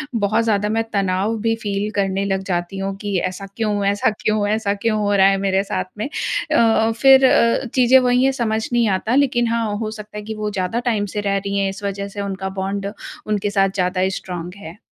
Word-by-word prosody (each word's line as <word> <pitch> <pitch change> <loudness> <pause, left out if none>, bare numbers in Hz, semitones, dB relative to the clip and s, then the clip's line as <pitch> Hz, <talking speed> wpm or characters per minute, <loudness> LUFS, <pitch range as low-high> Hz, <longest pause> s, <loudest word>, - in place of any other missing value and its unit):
बहुत 215 +1 +1
ज़्यादा 210 -2 +1
मैं 225 +1 +1
तनाव 195 +2 0
भी 225 +1 +1
फ़ील 200 -1 -2 0.2
करने 195 -1 0
लग 195 -1 -1
जाती 175 +1 -2
हूँ 195 0 -3
कि 205 -2 -1
ऐसा 185 +2 -7
क्यों, 210 -3 0
ऐसा 200 +2 +2
क्यों, 215 -1 0
ऐसा 215 -1 0
क्यों 215 +2 -1
हो 205 -1 +1
रहा 190 -1 +6
है 195 0 +3
मेरे 195 0 +1
साथ 195 -2 -3
में। 215 - -2
अ, 230 -7 +1
फिर 270 -1 +7
अ, 235 0 +3
चीज़ें 255 0 +6
वही 250 0 +2
है 270 - +4
समझ 220 -4 -1
नहीं 235 -2 +3
आता 225 +6 -1
लेकिन 260 -4 +2
हाँ, 225 -2 -1
हो 215 0 -3
सकता 210 -1 -9
है - - -4
कि 220 +1 -5
वो 210 0 -3
ज़्यादा 190 +3 -2
टाइम 210 -3 0
से 210 - 0
रह 200 -1 0
रही 200 0 -3
हैं 195 -1 +1
इस 195 +1 -8
वजह 200 0 -3
से 200 0 -6
उनका 190 -1 -4
बॉन्ड 195 +1 -3 0.4
उनके 210 -1 0
साथ 195 -1 +2
ज़्यादा 185 0 +1
स्ट्रॉन्ग 180 -2 -6
है। 170 -2 -10
205 Hz, 220 wpm, -20 LUFS, 195-225 Hz, 0.4 s, फिर